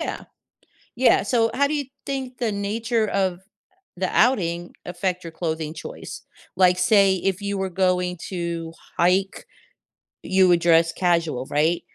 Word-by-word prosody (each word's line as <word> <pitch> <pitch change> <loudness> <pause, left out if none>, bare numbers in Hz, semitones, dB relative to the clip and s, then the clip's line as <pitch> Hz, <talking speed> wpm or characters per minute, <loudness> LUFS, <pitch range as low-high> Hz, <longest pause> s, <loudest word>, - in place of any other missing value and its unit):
Yeah. - - -4 0.7
Yeah, 255 +1 +4
so 230 -2 +1
how 280 +2 +2
do 295 - -3
you 290 -1 -2 0.2
think 265 -2 -4
the 235 -3 -1
nature 220 +3 -1
of 190 -3 -1 0.6
the 185 0 -1
outing 175 -8 +2
affect 180 +1 -3
your 165 - -7
clothing 160 -2 -3
choice? 160 - -8 0.3
Like, 180 -1 +4
say, 195 0 +4
if 190 +1 -2
you 200 0 -2
were 190 0 -2
going 180 -1 0
to 170 -3 -4 0.3
hike, 185 +3 +1 0.8
you 190 0 +3
would 175 -1 +5
dress 165 0 +4
casual, 165 -8 0
right? 160 +4 +1
185 Hz, 145 wpm, -23 LUFS, 170-200 Hz, 0.8 s, would